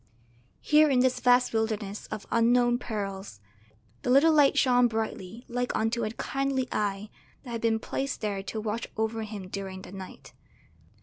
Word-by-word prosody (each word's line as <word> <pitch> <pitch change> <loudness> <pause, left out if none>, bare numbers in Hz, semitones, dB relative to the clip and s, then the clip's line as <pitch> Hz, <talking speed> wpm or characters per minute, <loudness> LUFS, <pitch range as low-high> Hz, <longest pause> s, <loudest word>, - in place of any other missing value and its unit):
Here 300 0 +5
in 255 -3 +3
this 255 0 +2
vast 250 0 +4
wilderness 215 -2 -2
of 215 -1 -6
unknown 240 +1 +3
perils 195 - -5 0.6
the - - -3
little 285 +5 +6
light 290 -3 +5
shone 250 -2 +4
brightly 220 -1 -4
like 245 0 -2
unto 225 +2 0
a 215 - -1
kindly 270 +3 -2
eye 205 0 -2 0.3
that 250 - -9
had 230 -1 -4
been 225 -1 +2
placed 270 +4 -3
there 205 -3 -2
to 215 +3 -5
watch 220 +2 -3
over 220 +1 -1
him 210 -3 -6
during 190 -1 -6
the - - -11
night. 190 -1 -10
225 Hz, 165 wpm, -28 LUFS, 210-250 Hz, 0.6 s, little